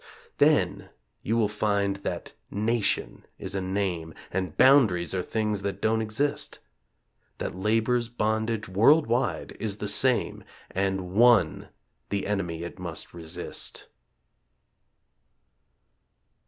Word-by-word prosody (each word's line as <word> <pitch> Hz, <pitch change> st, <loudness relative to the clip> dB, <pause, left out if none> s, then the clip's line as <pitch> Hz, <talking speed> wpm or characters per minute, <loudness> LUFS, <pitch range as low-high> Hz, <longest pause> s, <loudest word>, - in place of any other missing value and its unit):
Then -, -, +3 dB, 0.3 s
you 115 Hz, -, 0 dB
will 110 Hz, -2 st, +3 dB
find 100 Hz, -1 st, 0 dB
that 100 Hz, -, -5 dB, 0.2 s
"nation" 110 Hz, +1 st, 0 dB
is 95 Hz, -, -6 dB
a 95 Hz, -, -1 dB
name 95 Hz, -4 st, -2 dB, 0.2 s
And 95 Hz, -3 st, -3 dB
boundaries 105 Hz, -, +5 dB
are 95 Hz, -, 0 dB
things 105 Hz, +1 st, -1 dB
that 100 Hz, -1 st, -3 dB
don't 110 Hz, +2 st, +1 dB
exist; 110 Hz, +7 st, -2 dB, 0.8 s
That -, -, -4 dB
Labor's 115 Hz, +5 st, +1 dB
bondage, 110 Hz, -1 st, -1 dB
worldwide, 120 Hz, +5 st, +2 dB
is 105 Hz, -2 st, -3 dB
the 105 Hz, -, -4 dB
same, 125 Hz, +4 st, +2 dB, 0.3 s
And 95 Hz, -1 st, -1 dB
ONE 115 Hz, -6 st, +4 dB, 0.4 s
the 100 Hz, -1 st, -1 dB
enemy 90 Hz, -5 st, -2 dB
it 85 Hz, +2 st, -8 dB
must 85 Hz, -3 st, -5 dB
resist. 85 Hz, +1 st, -6 dB
100 Hz, 110 wpm, -27 LUFS, 95-115 Hz, 0.8 s, boundaries